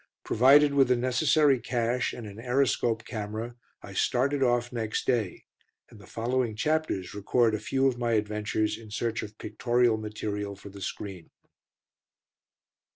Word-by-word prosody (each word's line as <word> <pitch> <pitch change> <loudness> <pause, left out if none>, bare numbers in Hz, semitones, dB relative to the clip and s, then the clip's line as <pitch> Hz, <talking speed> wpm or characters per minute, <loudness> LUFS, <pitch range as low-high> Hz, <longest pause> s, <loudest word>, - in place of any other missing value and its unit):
Provided 140 +5 +5
with 135 -2 +4
the 125 - +3
necessary 135 +3 +3
cash, 120 +1 -1
and 120 - -8
an 105 +1 -9
Aeroscope 120 -2 +1
camera, 110 +1 -5 0.3
I - - -9
started 135 +3 +1
off 120 -1 +1
next 110 -2 -2
day, 110 -8 -1 0.5
and 115 - -14
the 100 - -15
following 120 0 -1
chapters 150 - -1
record 110 +3 +2
a 105 - -1
few 135 +5 +1
of 125 -2 -1
my 120 -1 0
adventures 105 0 -1
in 110 -2 -12
search 115 +1 -2
of 105 0 -9
pictorial 120 -2 +1
material 105 -1 -4
for 100 +1 -12
the 100 0 -11
screen. 95 -2 -6
115 Hz, 150 wpm, -28 LUFS, 105-125 Hz, 0.5 s, Provided